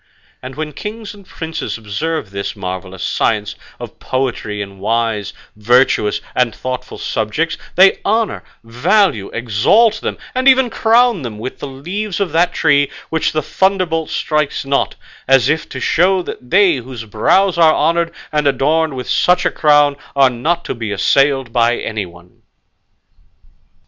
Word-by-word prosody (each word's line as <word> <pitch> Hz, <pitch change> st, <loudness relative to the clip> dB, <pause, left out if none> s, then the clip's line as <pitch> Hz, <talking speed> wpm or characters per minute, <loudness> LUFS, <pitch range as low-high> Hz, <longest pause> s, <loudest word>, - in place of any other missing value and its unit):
And 130 Hz, 0 st, -8 dB
when 155 Hz, 0 st, -5 dB
kings 210 Hz, +6 st, -7 dB
and 200 Hz, -2 st, -16 dB
princes 160 Hz, -4 st, -5 dB
observe 110 Hz, +4 st, -4 dB
this 100 Hz, 0 st, -4 dB
marvellous 95 Hz, -1 st, -6 dB
science 105 Hz, -2 st, 0 dB, 0.3 s
of -, -, -9 dB
poetry 125 Hz, -5 st, -3 dB
in 100 Hz, -1 st, -7 dB
wise, 110 Hz, 0 st, -1 dB, 0.2 s
virtuous, 110 Hz, 0 st, +2 dB
and 125 Hz, -3 st, 0 dB
thoughtful 130 Hz, -1 st, -5 dB
subjects, 130 Hz, +10 st, -2 dB, 0.2 s
they 190 Hz, +1 st, +5 dB
honour, 220 Hz, 0 st, 0 dB, 0.2 s
value, 125 Hz, -, +1 dB
exalt 130 Hz, -, +2 dB
them, -, -, -3 dB, 0.2 s
and 255 Hz, +1 st, 0 dB
even 260 Hz, -2 st, +5 dB
crown 230 Hz, -3 st, +3 dB
them 115 Hz, -5 st, -6 dB
with 120 Hz, +4 st, -7 dB
the 145 Hz, -, -5 dB
leaves 180 Hz, +9 st, -5 dB
of 195 Hz, -5 st, -1 dB
that 170 Hz, +3 st, +2 dB
tree 145 Hz, -2 st, +2 dB, 0.2 s
which 160 Hz, -1 st, 0 dB
the 155 Hz, -, -1 dB
thunderbolt 185 Hz, -4 st, 0 dB
strikes 150 Hz, -2 st, -1 dB
not, 140 Hz, 0 st, 0 dB, 0.3 s
as 135 Hz, 0 st, +4 dB
if 155 Hz, 0 st, -1 dB
to 130 Hz, -, -6 dB
show 180 Hz, +7 st, +2 dB
that 125 Hz, -6 st, -9 dB
they 185 Hz, -4 st, +4 dB
whose 125 Hz, -2 st, -8 dB
brows 170 Hz, -, +2 dB
are 160 Hz, -2 st, +5 dB
honoured 170 Hz, +2 st, +1 dB, 0.2 s
and 150 Hz, -1 st, +1 dB
adorned 145 Hz, +3 st, +1 dB
with 125 Hz, -1 st, -6 dB
such 180 Hz, 0 st, +2 dB
a -, -, +2 dB
crown 145 Hz, -2 st, +3 dB, 0.2 s
are 135 Hz, -2 st, +4 dB
not 165 Hz, +8 st, -1 dB
to -, -, -3 dB
be 115 Hz, -3 st, -5 dB
assailed 135 Hz, +4 st, +1 dB
by 120 Hz, 0 st, +2 dB
anyone." 90 Hz, -5 st, -7 dB
140 Hz, 150 wpm, -16 LUFS, 115-175 Hz, 0.3 s, they